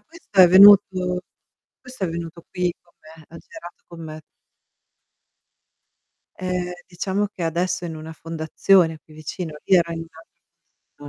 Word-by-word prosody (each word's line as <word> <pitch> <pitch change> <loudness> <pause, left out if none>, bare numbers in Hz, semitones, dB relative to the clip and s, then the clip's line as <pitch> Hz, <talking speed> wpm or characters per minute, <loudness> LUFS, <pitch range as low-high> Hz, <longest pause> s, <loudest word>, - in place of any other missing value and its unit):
questo 325 - -11
è 180 - +9
venuto 185 -1 +6 0.6
questo 250 -5 -7
è 180 - -2
venuto 170 0 -7
qui 180 -1 -1
con 170 - -32
me, 160 +1 -16
ha 165 - -13
girato 175 +2 -13
con 170 -1 -13
me. 155 0 -9 2.2
Eh, 180 -1 -3
diciamo 190 +3 -2
che 195 -3 -9
adesso 175 +2 -2
è 175 - -4
in 160 - -7
una 155 +1 -9
fondazione 160 +1 +1
qui 155 - -18
vicino, 155 +1 -7
io 190 - +4
ero 170 0 -4
in 165 0 -6 0.9
un'al 145 - -11
175 Hz, 145 wpm, -22 LUFS, 160-185 Hz, 2.2 s, è